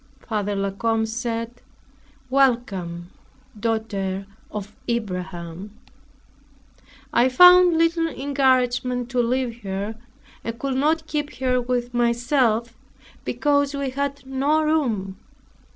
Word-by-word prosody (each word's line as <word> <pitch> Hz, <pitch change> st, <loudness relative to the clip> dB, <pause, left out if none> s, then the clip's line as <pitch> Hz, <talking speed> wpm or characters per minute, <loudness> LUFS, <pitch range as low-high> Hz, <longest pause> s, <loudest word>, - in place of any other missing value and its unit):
Father 205 Hz, -2 st, -1 dB
La 195 Hz, 0 st, -1 dB
Combe 225 Hz, +2 st, 0 dB
said, 230 Hz, +1 st, -4 dB, 0.7 s
"Welcome, 195 Hz, -10 st, +1 dB, 0.5 s
daughter 200 Hz, -4 st, -2 dB, 0.2 s
of 210 Hz, 0 st, -7 dB
Abraham!" 185 Hz, -3 st, -4 dB, 1.4 s
I 245 Hz, +2 st, +4 dB
found 360 Hz, +4 st, +7 dB
little 330 Hz, 0 st, +2 dB
encouragement 255 Hz, -4 st, +1 dB
to 250 Hz, -1 st, +2 dB
leave 240 Hz, -1 st, -1 dB
her 200 Hz, +2 st, -3 dB, 0.5 s
and 230 Hz, 0 st, -4 dB
could 275 Hz, +2 st, -2 dB
not 315 Hz, +3 st, +1 dB
keep 295 Hz, -2 st, -3 dB
her 255 Hz, -1 st, +1 dB
with 245 Hz, 0 st, -2 dB
myself, 235 Hz, -1 st, +1 dB, 0.5 s
because 285 Hz, -1 st, +1 dB
we 280 Hz, -2 st, -2 dB
had 280 Hz, 0 st, -3 dB
no 280 Hz, +4 st, +1 dB
room. 230 Hz, -12 st, 0 dB
240 Hz, 105 wpm, -23 LUFS, 215-275 Hz, 1.4 s, found